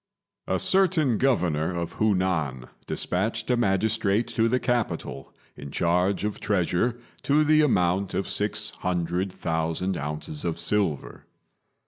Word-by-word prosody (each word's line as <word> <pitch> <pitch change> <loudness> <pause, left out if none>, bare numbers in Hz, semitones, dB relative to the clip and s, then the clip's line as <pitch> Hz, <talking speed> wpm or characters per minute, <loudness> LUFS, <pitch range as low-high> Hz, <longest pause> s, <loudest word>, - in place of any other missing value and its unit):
A - - +1
certain 165 - +3
Governor 90 - +1
of 85 -1 -3
Hu 110 -2 +1
nan 80 -9 -1 0.2
despatched 110 +6 -1
a - - +4
magistrate 110 0 +1
to 115 -1 +1
the 125 +2 +2
capital 120 - -2 0.2
in 70 - -9
charge 90 +6 +1
of 105 -1 -3
treasure 100 +4 0 0.2
to 150 +2 +3
the 155 0 +4
amount 95 - +1
of 95 - -1
six 105 0 0
hundred 90 +1 -2
thousand 80 +2 -2
ounces 75 +1 -4
of 85 -2 -2
silver. 85 -4 -1
95 Hz, 130 wpm, -26 LUFS, 85-115 Hz, 0.2 s, a